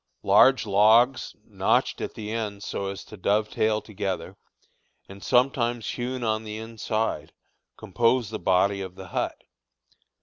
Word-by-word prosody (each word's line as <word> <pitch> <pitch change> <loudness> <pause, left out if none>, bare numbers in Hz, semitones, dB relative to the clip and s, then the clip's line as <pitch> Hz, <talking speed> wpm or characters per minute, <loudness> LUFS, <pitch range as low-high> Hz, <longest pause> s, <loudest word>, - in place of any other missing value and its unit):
Large 135 -2 +5
logs, 110 +5 +3
notched - - 0
at - - -5
the 105 -1 -6
ends 105 -3 -4
so 100 - -3
as 95 0 -6
to 110 - -12
dovetail 105 +2 0
together, 95 -3 -5 0.7
and 100 0 -12
sometimes 120 -2 +1
hewn 125 0 -4
on 110 -1 0
the 105 -1 -6
inside, 110 0 -3 0.4
compose 115 +2 0
the 110 - -4
body 100 +2 +2
of 95 -1 -7
the 95 -2 -10
hut. - - -3
110 Hz, 135 wpm, -25 LUFS, 100-115 Hz, 0.7 s, Large